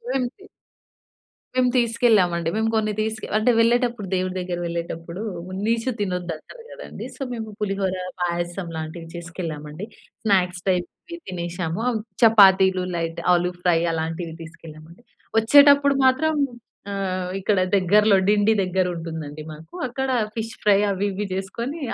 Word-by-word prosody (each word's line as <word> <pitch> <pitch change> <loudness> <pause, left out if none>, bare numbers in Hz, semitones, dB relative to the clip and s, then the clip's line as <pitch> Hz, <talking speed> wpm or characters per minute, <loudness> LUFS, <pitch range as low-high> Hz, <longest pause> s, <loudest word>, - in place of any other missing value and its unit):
ఏంటి? 265 +10 -3 1.1
మేము 255 -1 +3
తీసుకెళ్ళామండి. 215 -8 +2
మేము 220 0 +1
కొన్ని 215 -1 +1
తీసుకు 220 0 -3
అంటే 225 +3 +3
వెళ్ళేటప్పుడు 235 -3 +2
దేవుడి 185 0 -1
దగ్గరకి 175 -1 -3
వెళ్ళేటప్పుడు 170 +2 -5 0.4
నీచు 230 +2 0
తినొద్దు 180 -3 -2
అంటారు 465 - -14
కదండీ, - - -8
సో - - -14
మేము 220 -2 -5
పులిహోర, 195 -2 -1 0.3
పాయసం 175 +1 -2
లాంటివి 160 +1 -6
చేసుకెళ్ళామండి. 165 -1 -6 0.4
స్నాక్స్ 180 -3 +1
టైప్ 180 -2 +1 0.4
తినేసాము, 175 +1 -3 0.4
చపాతీలు, 190 -4 +6
లైట్ 165 0 -3
ఆలు 175 0 +2
ఫ్రై 175 -2 +3
అలాంటివి 165 +1 -3
తీసుకెళ్ళామండి. 165 +2 -12 0.4
వచ్చేటప్పుడు 280 +4 +6
మాత్రం, 305 +5 +3 0.6
ఆహ్, 185 -2 -2
ఇక్కడ 195 0 +1 0.2
దగ్గరలో 205 +2 +4
డిండి 210 +1 +4
దగ్గర 185 0 0
ఉంటుందండి, 160 -2 -6
మాకు 155 - -14
అక్కడ 265 +2 -3 0.3
ఫిష్ 225 0 -4
ఫ్రై 205 -1 +5
అవి 195 +1 -1
ఇవి 205 +1 -3
చేసుకొని, 235 - -4
190 Hz, 125 wpm, -23 LUFS, 170-225 Hz, 1.1 s, చపాతీలు